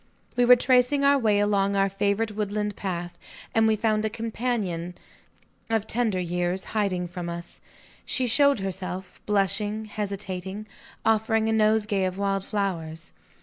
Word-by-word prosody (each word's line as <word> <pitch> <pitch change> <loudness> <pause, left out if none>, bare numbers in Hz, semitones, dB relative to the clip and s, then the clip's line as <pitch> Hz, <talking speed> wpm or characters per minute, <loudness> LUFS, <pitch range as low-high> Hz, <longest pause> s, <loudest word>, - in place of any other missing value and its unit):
We 245 - +4
were 250 +1 +9
tracing 255 +3 +3
our 280 0 +5
way 215 -4 +3
along 200 -1 +2
our 195 0 +3
favorite 200 +3 0
woodland 210 0 -2
path; 175 -2 -4 0.3
and 225 0 +4
we 220 - +3
found 215 0 +1
a 220 - 0
companion 215 -6 -3 0.7
of 225 -2 +1
tender 220 -4 0
years, 180 +1 -1
hiding 190 -5 0
from 175 0 -6
us. 170 0 -8 0.4
She 260 - -1
showed 280 0 +4
herself; 185 -1 -5
blushing, 210 +1 0
hesitating, 200 -1 -5 0.4
offering 220 0 +2
a - - +2
nosegay 215 -2 +2
of 185 0 -3
wild 195 -1 0
flowers. 170 -6 -3
205 Hz, 145 wpm, -26 LUFS, 190-220 Hz, 0.7 s, were